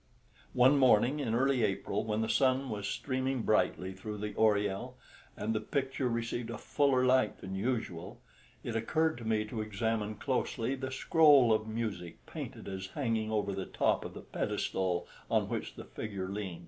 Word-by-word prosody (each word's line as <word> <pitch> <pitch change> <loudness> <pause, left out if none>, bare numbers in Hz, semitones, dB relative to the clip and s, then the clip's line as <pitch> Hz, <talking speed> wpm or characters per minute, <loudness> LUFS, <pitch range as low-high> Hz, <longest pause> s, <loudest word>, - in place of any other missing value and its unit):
One 130 +3 +6
morning 130 +2 +4
in 115 -5 -1
early 130 0 +2
April, 100 +1 -1
when 110 0 -1
the 110 - 0
sun 130 0 +2
was 100 -1 -3
streaming 130 -2 -1
brightly 95 -3 +1
through 105 +3 -6
the 105 0 -4
oriel, 105 +3 +1 0.4
and 110 +2 -1
the 110 - 0
picture 135 +2 -1
received 115 0 -2
a 115 - -4
fuller 130 -1 +2
light 130 -4 +3
than 95 - -7
usual, 100 -5 -3 0.4
it 115 - -4
occurred 155 +6 +1
to 115 - -8
me 110 -1 +1
to 110 +1 -4
examine 110 0 -1
closely 125 0 -1
the 130 -1 -4
scroll 135 -3 +5
of 110 0 0
music 105 -7 -4
painted - - -7
as 95 -1 -5
hanging 110 -1 -1
over 100 -2 0
the 95 -1 -4
top - - +1
of - - -8
the - - -7
pedestal 90 -2 -2 0.2
on - - +2
which - - -4
the - - -9
figure 100 -4 -5
leant. 100 -4 -4
110 Hz, 175 wpm, -32 LUFS, 105-130 Hz, 0.4 s, One